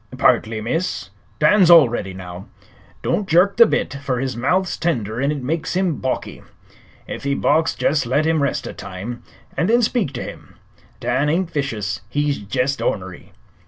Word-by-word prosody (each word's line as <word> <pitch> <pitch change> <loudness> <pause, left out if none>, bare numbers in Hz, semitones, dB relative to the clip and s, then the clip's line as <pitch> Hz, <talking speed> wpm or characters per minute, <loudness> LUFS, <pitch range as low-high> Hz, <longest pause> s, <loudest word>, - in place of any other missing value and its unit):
"Partly, 110 0 +2
miss. 165 +11 -2 0.3
Dan's 195 -4 +5
already 120 - +5
now. 90 0 -9 0.6
Don't 205 -2 -1
jerk 180 +5 +4
the 235 -1 +8
bit, - - -1
fer 135 -3 -1
his 130 +1 -2
mouth's 180 +10 0
tender 120 - -2
an' 140 +1 +1
it 145 -3 -4
makes 160 +6 -2
him 180 -6 +1
balky. 130 - -3 0.7
Ef - - -6
he 140 0 0
balks 160 +3 +2
jest 145 -4 +1
let 140 +5 +1
him 160 -1 +2
rest 140 - -1
a - - -6
time, 110 +7 -7 0.3
an' 165 - +1
then 235 +2 +3
speak 220 - 0
to 125 - -4
him. - - -10 0.4
Dan 130 +5 0
ain't 175 +2 0
vicious; 110 - -2
he's 145 +1 0
jest 125 +6 -1
ornery." 95 -2 -3
140 Hz, 165 wpm, -20 LUFS, 120-165 Hz, 0.7 s, the